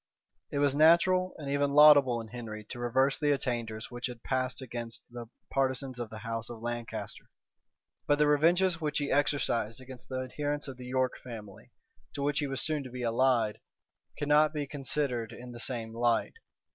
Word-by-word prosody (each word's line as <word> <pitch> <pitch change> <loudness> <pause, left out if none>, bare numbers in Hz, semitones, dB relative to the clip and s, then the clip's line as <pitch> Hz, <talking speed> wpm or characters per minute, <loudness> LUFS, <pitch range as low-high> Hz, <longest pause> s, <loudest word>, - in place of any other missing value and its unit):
It - - -4
was 140 -1 +3
natural, 170 +4 +4
and 145 - -7
even 140 0 +1
laudable 145 -5 +7
in 110 - -10
Henry 110 -2 -7
to 120 - -6
reverse 130 +3 +2
the 150 -1 +2
attainders 115 -4 -3
which 120 +1 -3
had 120 -2 -10
passed 130 -1 -1
against 120 -3 -6
the 120 -1 -8 0.2
partisans 130 -1 -1
of 120 -2 -4
the 110 - -8
house 115 -1 -3
of 120 -2 -8
Lancaster: 120 0 -5 0.8
but 145 - +4
the 150 - +4
revenges 170 +4 +3
which 150 -1 -1
he 145 -1 -1
exercised 125 -5 +1
against 130 -1 -11
the 130 0 -2
adherents 145 +3 -3
of 135 -2 -7
the 125 -1 -9
York 130 0 0
family, 110 -5 -10 0.5
to 140 - -3
which 145 +1 +1
he 145 - -1
was 135 -1 -2
so 155 - +1
soon 150 -2 -2
to 130 - -8
be 125 0 -6
allied, 115 -2 +2 0.6
cannot 150 +1 +3
be 145 -1 -1
considered 135 -4 -2
in 125 +1 -9
the 120 - -9
same 115 -2 -3
light. 120 0 +1
130 Hz, 185 wpm, -30 LUFS, 120-145 Hz, 0.8 s, laudable